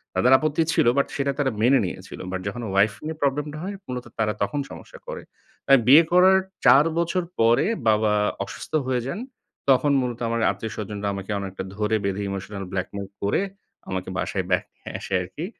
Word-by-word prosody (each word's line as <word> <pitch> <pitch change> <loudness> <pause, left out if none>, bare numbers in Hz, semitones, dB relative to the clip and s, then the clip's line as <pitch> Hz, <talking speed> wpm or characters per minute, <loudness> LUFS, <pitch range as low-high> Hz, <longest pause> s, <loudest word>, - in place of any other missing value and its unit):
তাদের 125 - +3
আপত্তি 155 +2 +1
ছিল। - - +3
বাট 140 - +3
সেটা 140 0 0
তারা 135 -2 +2
মেনে 130 +4 +5
নিয়েছিল। 95 +1 -7
বাট 95 0 -3
যখন 120 +4 -4
ওয়াইফ 100 +2 +4
নিয়ে 160 +1 -4
প্রবলেমটা 145 +2 -1
হয় 200 +2 -4
মূলত 125 -1 -5
তারা 105 -1 +1
তখন 145 +8 0
সমস্যা - - -11
করে। - - -5 0.5
আর 135 - +9
বিয়ে 150 +6 +9
করার 185 +2 +6 0.3
৪ 140 +3 +7
বছর 170 +2 +1 0.2
পরে 115 +1 +4 0.2
বাবা 105 0 +3 0.3
অসুস্থ - - -9 0.2
হয়ে 125 -2 +1
যান। 155 +9 -4 0.5
তখন 135 +2 +4
মূলত 120 -2 -3
আমার 115 0 -1
আত্মীয়স্বজনরা 105 0 -5
আমাকে 100 +1 -6
অনেকটা 95 -1 -5
ধরে 105 +1 0
বেঁধে 100 0 -1
emotional 100 +1 -5
blackmail 95 +1 -4
করে 100 - +1 0.5
আমাকে 95 0 -3
বাসায় 95 -2 -2
back 90 - +3
নিয়ে - - -11
আসে - - -7
আরকি। 95 - -6
115 Hz, 175 wpm, -24 LUFS, 100-140 Hz, 0.5 s, আর